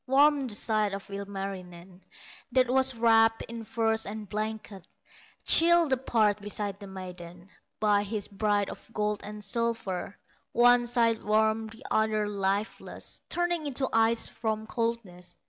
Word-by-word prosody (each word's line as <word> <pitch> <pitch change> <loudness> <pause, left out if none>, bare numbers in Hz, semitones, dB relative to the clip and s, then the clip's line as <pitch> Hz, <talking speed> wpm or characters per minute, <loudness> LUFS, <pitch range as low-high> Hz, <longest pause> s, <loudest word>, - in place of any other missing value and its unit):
Warm 280 +1 +4
the 215 - -2
side 215 -2 +1
of 200 0 -10
Ilmarinen 195 -2 -7 0.5
That 255 0 +4
was 265 0 +3
wrapped 225 -1 +4
in 230 0 -7
furs 225 0 0
and 210 0 -6
blankets; 215 -2 -5 0.6
Chill 340 -1 +5
the 265 - +2
parts 215 -5 +1
beside 205 -1 -3
the 200 - -9
maiden, 180 -1 -9 0.3
By 210 -1 +3
his 205 0 -2
bride 205 -1 0
of - - -12
gold 210 -1 -1
and 210 0 -8
silver; 225 -5 -2 0.4
One 240 0 +5
side 230 -2 +2
warm, 220 +1 +2
the 225 +1 -13
other 215 -1 +1
lifeless, 200 +1 -3
Turning 345 -3 0
into 265 -1 -1
ice 225 0 +2
from 220 -1 -3
coldness. 225 -6 -4
220 Hz, 140 wpm, -28 LUFS, 200-230 Hz, 0.6 s, Chill